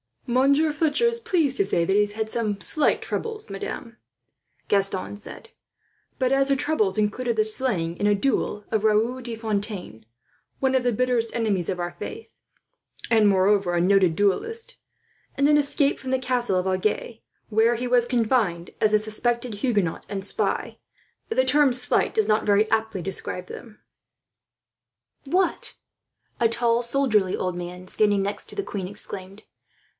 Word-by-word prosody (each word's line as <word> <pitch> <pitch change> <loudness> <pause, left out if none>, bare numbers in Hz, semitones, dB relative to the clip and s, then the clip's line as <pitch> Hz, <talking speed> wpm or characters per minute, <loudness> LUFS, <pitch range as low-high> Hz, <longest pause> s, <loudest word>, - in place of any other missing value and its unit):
"Monsieur 280 +5 +3
Fletcher 305 +7 +1
is 470 0 -1
pleased 325 - +1
to 400 - +3
say 170 - +1
that 190 - 0
he 210 0 +4
has 205 - -11
had 220 0 -3
some 215 -3 -2
slight 305 +8 +2
troubles, 445 -2 -4
madame," 230 +4 -6 0.7
Gaston 195 0 +1
said; 455 - -11 0.7
"but 255 -1 0
as 270 0 +3
the 275 - +2
troubles 260 -9 0
included 225 +3 0
the 215 - +3
slaying 215 -7 -2
in 205 - 0
a 205 - +4
duel 210 -2 -1
of 220 -1 0
Raoul 225 +4 +2
de 235 -2 -6
Fontaine, 205 - -4 0.5
one 265 -1 +1
of 260 -1 +2
the 245 -1 +1
bitterest 240 -1 0
enemies 210 -7 0
of 185 -2 -2
our 175 0 -3
faith, 450 +1 -8 0.7
and 220 -2 +5
moreover 195 -2 +2
a 170 - +2
noted 185 -2 +3
duellist; 455 - -1 0.6
and 280 - +3
an 295 - +5
escape 285 0 +1
from 260 - -5
the 260 - +3
castle 250 -6 0
of 180 - -1
Agen, 195 +4 -1 0.3
where 225 +2 +3
he 245 +2 -3
was 245 -1 +3
confined 220 -8 0
as 215 -1 +2
a 215 - +5
suspected 235 +2 -2
Huguenot 205 -6 -1
and 195 -2 -4
spy, - - -2 0.5
the - - +2
term 290 -3 +4
slight 250 0 +1
does 220 -1 +1
not 215 0 +2
very 210 +1 +2
aptly 220 -4 0
describe 180 -1 -4
them." 220 -3 -11 1.5
"What!" 365 - 0 0.6
A 235 - +4
tall 235 +1 +1
soldierly 235 -6 +2
old 185 -1 -3
man, 180 +1 -7
standing 205 0 +2
next 200 +1 -4
to - - -10
the 400 - -2
queen, 195 - -5
exclaimed. 195 +1 -3
220 Hz, 165 wpm, -24 LUFS, 200-260 Hz, 1.5 s, and